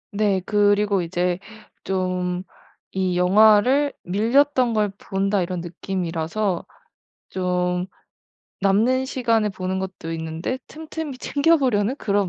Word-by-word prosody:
네. 205 -3 +1
그리고 205 -1 +2
이제 175 +1 -1 0.4
좀 185 -1 -1 0.5
이 185 -1 0
영화를 215 +9 +5
'밀렸던 240 +6 +2
걸 210 -1 +1
본다.' 195 0 -1
이런 180 0 -3
느낌이라서 175 +1 -3 0.7
좀 180 -1 -1 0.7
남는 225 +7 +2
시간에 230 -5 +1
보는 190 -1 -3
것도 185 -3 -6
있는데 160 +9 -4
틈틈이 310 -3 -7
챙겨 295 +5 +3
보려는 250 -4 +1
그런 200 -6 0
200 Hz, 230 characters per minute, -22 LUFS, 180-225 Hz, 0.7 s, 영화를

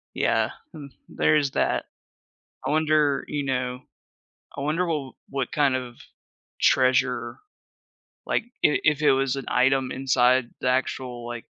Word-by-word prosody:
Yeah, - - +1 0.2
hmm, 150 -4 -9 0.2
there's 150 -3 +2
that. - - 0 0.8
I - - 0
wonder, 155 -2 +2
you 145 -1 -2
know 125 -1 -2 0.8
I - - -5
wonder 155 +6 0
wh 150 -6 -3 0.2
what 135 -2 -3
kind 145 -3 +2
of 125 -2 -6 0.6
treasure 130 -1 +2 0.9
like, - - 0 0.2
i 150 - +3
if 150 -1 +2
it 150 - +5
was 135 0 +1
an 135 - -5
item 130 +1 +2
inside 130 -2 +2
the - - -1
actual, 125 -1 -2
like, 120 -1 -6
135 Hz, 135 wpm, -25 LUFS, 125-150 Hz, 0.9 s, it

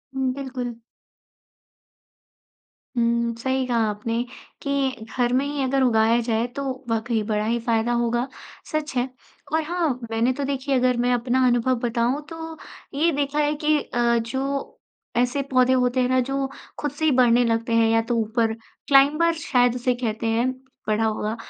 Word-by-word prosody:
हुँ, 265 -1 0
बिल्कुल। 255 -3 -5 2.2
हुँ, 235 0 +1
सही 260 +1 0
कहा 240 -2 +1
आपने 225 +3 -2 0.4
कि 275 -5 -1
घर 245 -1 +2
में 265 +2 +2
ही 285 0 -2
अगर 270 +1 +1
उगाया 230 -1 +4
जाए 230 0 0
तो 280 - -3 0.3
वाक़ई 225 0 0
बड़ा 210 0 -1
ही 235 +2 0
फ़ायदा 230 0 0
होगा, 240 +1 0 0.4
सच 310 -2 -2
है। 245 +1 +1 0.5
और 320 - +3
हाँ, 320 -6 -1
मैंने 230 +3 +2
तो 280 - -4
देखिए 275 0 -1
अगर 250 -1 +2
मैं 245 +1 +2
अपना 250 +2 +2
अनुभव 245 +1 +2
बताऊँ 235 +4 0
तो 325 -1 -7 0.4
ये 315 +5 +2
देखा 285 0 -1
है 295 0 +2
कि 305 0 +4
अ, 235 0 +1
जो 265 +4 -3 0.4
ऐसे 250 +3 +2
पौधे 255 0 +4
होते 250 0 +2
हैं 250 - +1
ना, 255 0 +3
जो 270 +1 -1 0.3
खुद 295 - -2
से 290 +3 -3
ही 310 - +4
बढ़ने 245 -2 +4
लगते 230 0 0
हैं 225 -1 +4
या 225 0 +3
तो 235 +1 -2
ऊपर 225 +1 0 0.3
क्लाइंबर 295 +5 +5 0.2
शायद 245 -2 +4
उसे 250 0 +1
कहते 230 -2 -2
हैं, 235 +3 +1 0.4
पढ़ा 215 +1 +1
होगा 215 0 -1
250 Hz, 165 wpm, -23 LUFS, 230-275 Hz, 2.2 s, क्लाइंबर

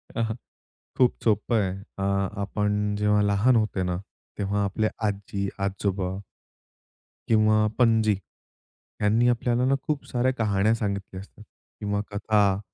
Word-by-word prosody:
अ, - - -2
हं. 110 0 -2 0.6
खूप 125 -2 +4
सोपं 110 +1 +1
आहे. 95 -2 -1 0.3
अ, 95 - -1 0.4
आपण 105 0 -1
जेव्हा 105 0 +2
लहान 100 +5 +3
होते 105 -4 +1
ना, 90 - -1 0.4
तेव्हा 100 0 0
आपले 100 +2 0 0.2
आजी-आजोबा 100 -1 -2 1.1
किंवा 110 -1 +4
पणजी. 110 -3 +4 0.8
त्यांनी 110 +4 +3
आपल्याला 120 +1 +1
ना 135 +1 +3
खूप 150 -3 -1
साऱ्या 130 0 +1
कहाण्या 105 -3 +2
सांगितल्या 100 -4 -4
असतात 105 +2 -15 0.4
किंवा 105 -1 -1
कथा. 100 -1 +2
105 Hz, 125 wpm, -26 LUFS, 100-110 Hz, 1.1 s, खूप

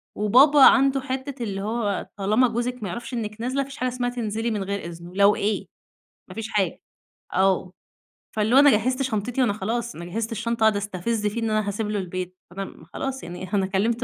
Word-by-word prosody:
وبابا 270 +8 +5
عنده 270 0 +5
حتّة 265 -1 -4
اللي 195 -3 -3
هو 210 -2 -2
طالما 215 +6 +3
جوزِِك 240 0 -3
ما 190 - -3
يعرفش 235 +5 -6
إنِك 220 -1 -4
نازلة 260 +3 0
ما - - -10
فيش 275 - -10
حاجة 255 +1 0
اسمها 245 0 -2
تنزلي 225 -1 -2
من 205 -2 -1
غير 200 +1 -2
إذنه، 170 +1 -9
لو 200 +1 +5
إيه 210 +1 -1 0.6
ما - - -10
فيش 225 0 -5
حاجة. 195 -5 0 0.5
آه، 185 -1 +2 0.6
فاللي 220 +4 +2
هو - - +9
أنا 290 0 +7
جهزت 255 +5 +1
شنطتي، 245 0 -1
وأنا 230 -5 +2
خلاص 230 +4 -3
أنا 170 - -7
جهزت 225 +5 -3
الشنطة 230 +1 -2
وقاعدة 215 -2 +4
استفز 210 +2 -2
فيه 230 +3 -2
إن 225 - 0
أنا 215 -1 +1
هاسيب 210 +1 -3
له 210 -1 -1
البيت، 185 0 -5
فأنا 195 +1 -4
م 160 - -13
خلاص 265 +9 -5
يعني 180 +3 -7
أنا 195 -2 +2
كلمت 220 +5 0
220 Hz, 210 wpm, -24 LUFS, 195-245 Hz, 0.6 s, هو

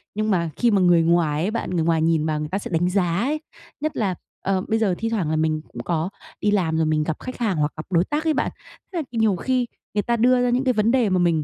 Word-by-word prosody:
nhưng 215 0 0
mà 170 -3 +1
khi 240 -2 +2
mà 195 -2 +3
người 175 -2 +5
ngoài 165 -3 +2
ấy 205 - 0
bạn, 230 - -3
người 170 -3 0
ngoài 165 -1 +2
nhìn 160 -1 +2
vào 155 -1 0
người 150 0 -4
ta 190 - -1
sẽ - - -7
đánh 175 +2 +1
giá 180 -3 +1
ấy, 295 +8 -1 0.4
nhất 310 0 -2
là, 195 -5 0 0.3
ờ, 190 -1 0
bây 220 0 +1
giờ 195 -5 +1
thi 225 - -2
thoảng 195 -9 -1
là 160 - 0
mình 155 0 0
cũng 120 0 -8
có 170 +1 -1 0.3
đi 205 - +2
làm 165 -6 +1
rồi 160 - +2
mình 155 0 +1
gặp 155 -1 -2
khách 255 - -7
hàng 215 -8 0
hoặc 150 0 +1
gặp 155 - -6
đối 170 0 +4
tác 300 +2 -2
ấy 320 -1 +2
bạn, - - 0 0.4
thế - - -3
là - - 0
k 250 - -23
nhiều 220 -4 +2
khi 250 +5 0 0.3
người 205 - +3
ta 235 -1 0
đưa 250 +2 +4
ra 245 - +2
những 250 +2 +1
cái 255 -2 +2
vấn 215 +1 +2
đề 245 -6 +3
mà 185 -1 +2
mình 165 -3 +2
185 Hz, 300 wpm, -23 LUFS, 160-230 Hz, 0.4 s, người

